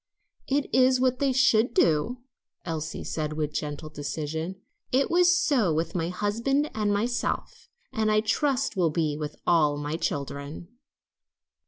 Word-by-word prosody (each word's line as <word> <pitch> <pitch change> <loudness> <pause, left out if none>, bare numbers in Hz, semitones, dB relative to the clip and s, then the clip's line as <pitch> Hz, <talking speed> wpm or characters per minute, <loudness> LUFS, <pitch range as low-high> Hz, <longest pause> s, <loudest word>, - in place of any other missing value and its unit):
"It 280 +1 +1
is 255 +1 +4
what 255 0 +1
they 275 -1 +2
should 245 -3 +3
do," 170 +11 +2 0.4
Elsie 160 -1 -4
said 155 -1 -3
with 150 -1 -2
gentle 150 +1 -4
decision. 160 +4 -4 0.4
"It 270 +2 +2
was 355 0 +5
so 275 - +2
with 160 +1 -1
my 170 -2 -1
husband 230 +10 0
and 210 -1 0
myself, 230 +4 -2 0.2
and 220 -3 +1
I 215 0 +4
trust 270 +2 0
will 175 -4 +2
be 155 -2 0
with 150 -1 -5
all 150 -4 +3
my 145 +2 -3
children." 140 +2 -4
190 Hz, 145 wpm, -26 LUFS, 155-255 Hz, 0.4 s, was